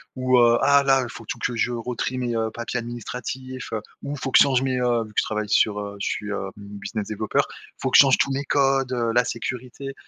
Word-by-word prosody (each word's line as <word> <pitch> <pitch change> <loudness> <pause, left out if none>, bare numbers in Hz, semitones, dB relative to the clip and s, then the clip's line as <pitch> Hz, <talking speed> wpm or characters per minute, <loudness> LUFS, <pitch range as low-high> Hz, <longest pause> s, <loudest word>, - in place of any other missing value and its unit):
ou 130 -1 +2
heu, 120 0 +5
ah 140 0 +5
là 135 -1 +4
il 120 - -6
faut 115 - -10
tout - - -4
que 125 - -2
je 120 +2 0
re-trie 120 +2 -3
mes, 120 -2 -2
heu, 110 0 0
papiers 115 +2 -4
administratifs, 125 +2 -6
heu, 110 - -2 0.2
ou 145 - -4
faut 135 -1 -4
que - - +7
je - - +9
change 130 -3 +2
mes, 130 -1 0
heu, 120 -2 +2
vu - - -13
que - - +2
je - - +2
travaille 105 -1 -3
sur, 105 0 +3
heu, 100 0 -6
je - - -2
suis, 105 0 -3
heu, 100 -1 -3
business 100 +1 -6
développeur, 110 0 0
il - - -16
faut 130 - -2
que - - +7
je - - +11
change 135 -2 +4
tous 140 - +1
mes 140 +1 -2
codes, 135 -2 +2
heu, 120 -2 0
la 120 +1 +4
sécurité. 125 +3 -5
120 Hz, 260 wpm, -24 LUFS, 110-130 Hz, 0.2 s, je